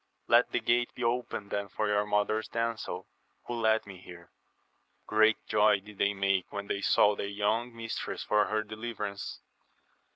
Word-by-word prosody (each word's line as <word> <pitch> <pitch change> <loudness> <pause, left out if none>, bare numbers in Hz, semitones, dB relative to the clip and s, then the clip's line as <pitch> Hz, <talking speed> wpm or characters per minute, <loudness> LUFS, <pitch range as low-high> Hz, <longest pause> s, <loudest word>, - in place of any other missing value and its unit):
— - - -46
^Letthe - - +3
gate 120 0 +2
be 125 - -5
opened 115 -4 -2
then 100 0 -2
for 105 +3 -1
your 105 0 +1
mother's 105 +1 +1
damsels, 115 -5 -3 0.4
who 120 - -4
led 110 -1 +2
me 95 -2 -10
here* 90 -2 -13 0.7
Great 110 0 +4
joy 105 -1 +4
did 105 0 -15
they 100 0 +2
make 95 -1 0
when 100 0 -4
they 100 0 -2
saw 105 +1 +4
their 100 - -3
young 105 +4 0
mistress 115 -1 -4
for 105 0 +3
her 110 0 -1
deUverance. 110 -2 -5
105 Hz, 165 wpm, -30 LUFS, 100-110 Hz, 0.7 s, Great